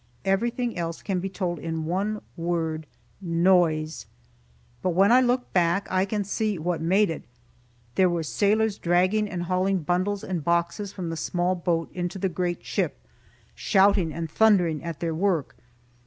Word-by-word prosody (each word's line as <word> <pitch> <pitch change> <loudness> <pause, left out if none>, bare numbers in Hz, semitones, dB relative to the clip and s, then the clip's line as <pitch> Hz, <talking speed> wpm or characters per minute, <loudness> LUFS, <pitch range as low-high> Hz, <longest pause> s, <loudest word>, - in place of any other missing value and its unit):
Everything 235 +5 0
else 165 -1 -4
can 190 -3 -1
be 195 +2 -3
told 180 -3 -3
in 160 0 -3
one 200 +5 -2
word 165 -2 -2 0.3
noise. 170 -3 +2 0.7
But 180 -2 0
when 195 +4 +5
I 255 +1 +7
look 250 0 0
back, 175 +2 +2
I 185 +1 +2
can 205 +1 -2
see 210 0 -1
what 170 +1 -2
made 190 +3 +3
it. 160 - -5 0.7
There 185 +7 +4
were 170 -1 -1
sailors 210 +5 +1
dragging 185 +5 +2
and 175 -2 -3
hauling 185 0 0
bundles 185 +5 0
and 175 -5 -3
boxes 170 +4 0
from 175 -4 -5
the 165 - -4
small 175 +3 0
boat 170 -2 -1
into 175 +1 -3
the 190 0 0
great 175 0 -3
ship, - - -1 0.6
shouting 195 -4 +3
and 165 +1 -4
thundering 175 -4 +3
at 170 -3 -6
their 165 -1 -1
work. 170 -4 0
180 Hz, 160 wpm, -25 LUFS, 170-200 Hz, 0.7 s, I